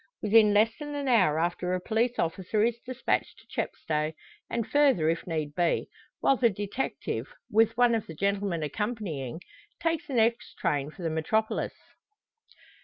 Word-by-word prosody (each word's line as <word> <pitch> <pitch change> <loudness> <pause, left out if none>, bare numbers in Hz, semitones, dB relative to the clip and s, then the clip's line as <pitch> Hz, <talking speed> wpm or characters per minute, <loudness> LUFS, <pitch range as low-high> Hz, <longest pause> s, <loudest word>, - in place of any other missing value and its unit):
Within 215 0 +6
less 215 +2 +4
than 295 -1 -5
a 285 -1 -3
hour 185 -10 +4
after 175 +2 0
a - - -1
police 230 +5 0
officer 190 +5 0
is 235 0 +1
despatched 255 +1 -2
to - - -20
Chepstow, 155 0 -2 0.4
and 235 -2 -1
further 275 - +4
if 165 +2 -2
need 155 -3 -2
be; 170 +1 +1 0.3
while 270 - +4
the 235 -1 +4
detective, 205 - -3 0.2
with 225 +1 +3
one 245 -1 +5
of 225 -2 -1
the 160 - -8
gentlemen 200 -2 0
accompanying, 165 - -3 0.4
takes 330 +1 -1
the 275 - -4
next 230 +1 +1
train 145 -1 0
for 175 +3 -11
the 165 - 0
metropolis. 215 +8 0
210 Hz, 160 wpm, -28 LUFS, 165-235 Hz, 0.4 s, Within